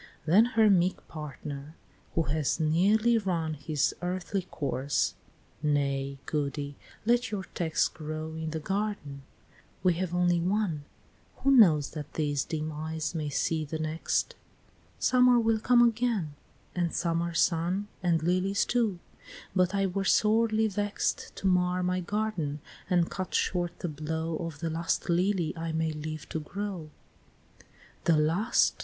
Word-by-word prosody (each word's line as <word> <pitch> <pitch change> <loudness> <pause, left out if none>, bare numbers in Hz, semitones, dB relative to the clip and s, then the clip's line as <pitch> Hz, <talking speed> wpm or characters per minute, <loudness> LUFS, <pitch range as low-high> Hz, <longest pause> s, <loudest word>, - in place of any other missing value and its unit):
Then 190 +8 +6
her 220 -1 +7
meek 185 -2 +2
partner, 150 -1 -7 0.4
who 165 - +3
has 155 +1 0
nearly 205 +9 +3
run 170 -6 -1
His 150 0 0
earthly 185 +2 -2
course, 140 -1 -1 0.5
"Nay, 140 -2 0
Goody, 145 -1 -2 0.3
let 240 +1 +3
your 205 -2 -3
text 160 -3 0
Grow 155 0 -5
in 160 0 -4
the 160 0 -3
garden. 190 -6 -3 0.6
We 180 -2 +4
have 180 -2 -2
only 175 -1 +3
one 180 -4 0 0.6
Who 275 - +4
knows 170 - +6
that 150 -2 -7
these 145 -3 0
dim 155 -1 -3
eyes 155 +1 -3
may 155 -3 -2
see 155 +3 0
the 155 +2 -4
next? 155 +1 -1 0.6
Summer 250 -1 +5
will 225 -1 +2
come 240 +1 +5
again, 225 -9 0 0.4
and 175 -2 0
summer 170 0 0
sun, 175 +6 +1
And 170 -3 +1
lilies 185 +3 +1
too, 230 -6 +1 0.6
but 185 +1 +2
I 195 0 +2
were 195 +1 -1
sorely 220 +2 +3
vext 205 0 -2
To - - -8
mar 180 -1 +2
my 180 0 0
garden, 180 -6 -2 0.3
and 175 -2 +2
cut 185 -1 -4
short 175 -2 0
the - - -3
blow 160 +2 -3
Of 165 -2 -6
the 165 - -1
last 165 +1 -1
lily 175 -2 +1
I 165 0 -3
may 160 0 0
live 155 0 -6
to 160 - -2
grow," 195 +1 -5
IX. 155 - -26 0.4
"The 165 -2 +4
last!" 165 +10 +3
170 Hz, 145 wpm, -29 LUFS, 155-195 Hz, 0.6 s, her